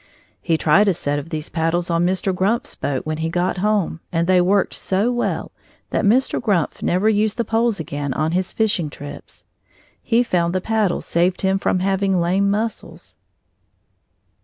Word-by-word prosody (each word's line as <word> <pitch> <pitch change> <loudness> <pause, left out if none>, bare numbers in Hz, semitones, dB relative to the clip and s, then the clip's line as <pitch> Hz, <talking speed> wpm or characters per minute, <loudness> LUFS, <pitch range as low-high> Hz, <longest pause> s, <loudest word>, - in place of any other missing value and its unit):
He 165 -2 +1
tried 165 +7 +4
a 195 - +3
set 145 -2 -2
of 145 - -9
these 155 -2 -4
paddles 170 +1 -1
on 170 +1 +2
Mr. 190 +1 0
Grumpf's 200 +6 0
boat 135 -2 -3
when 155 0 -2
he 160 +1 -2
got 180 +3 -1
home, 200 -4 0
and 165 0 +1
they 185 0 +4
worked 195 +2 +2
so 200 +6 0
well 240 -1 -2 0.4
that - - 0
Mr. 250 +6 +2
Grumpf 195 -9 0
never 185 +4 +1
used 215 0 +1
the 235 - 0
poles 225 -2 +1
again 145 -2 -4
on 155 +2 0
his 180 +1 -1
fishing 205 -8 0
trips. 145 0 -11 0.6
He 240 +1 +2
found 175 -5 0
the - - +2
paddles 215 -3 0
saved 175 +2 +1
him 190 0 +1
from 185 - 0
having 195 -1 +1
lame 190 +4 +1
muscles. 215 +3 -4
185 Hz, 175 wpm, -20 LUFS, 165-205 Hz, 0.6 s, tried